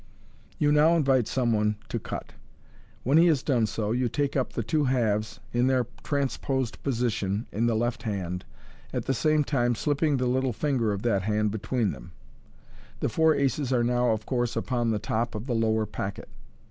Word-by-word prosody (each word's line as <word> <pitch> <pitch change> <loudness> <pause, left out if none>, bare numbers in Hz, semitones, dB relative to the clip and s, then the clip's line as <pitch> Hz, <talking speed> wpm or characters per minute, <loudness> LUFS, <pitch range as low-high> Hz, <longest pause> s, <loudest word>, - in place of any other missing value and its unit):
You 145 -1 +2
now 155 +3 +5
invite 135 -7 +3
some 120 -3 +1
one 105 0 +1
to 115 - -2
cut. - - -7 0.7
When 140 +6 +4
he 170 - +6
has 150 -5 +2
done 120 -6 +2
so, 105 0 -2
you 125 +1 +1
take 145 +1 -1
up 130 -3 0
the 115 - -2
two 150 +5 +1
halves, 110 -5 0
in 120 +1 +2
their 130 -2 +2 0.2
transposed 135 -3 -1
position, 115 -5 -1
in 115 +3 0
the 115 - +1
left 120 +2 -1
hand, 90 -4 -3 0.5
at - - -3
the 135 - +1
same 155 +3 +2
time 120 -4 +1
slipping 145 +3 +1
the 125 - 0
little 130 0 +1
finger 120 -2 0
of 100 0 -3
that 105 -5 +2
hand 105 +1 0
between 110 0 -1
them 65 -4 -11 0.9
The - - 0
four 160 +5 +3
aces 135 -1 0
are 120 -2 +3
now, 120 0 +2
of 110 -1 -1
course, 120 -2 -1
upon 120 -2 0
the 110 - +1
top 115 +2 -2
of 105 +2 -5
the 130 - -2
lower 110 -1 +1
packet. 100 -1 -5
120 Hz, 190 wpm, -27 LUFS, 110-135 Hz, 0.9 s, he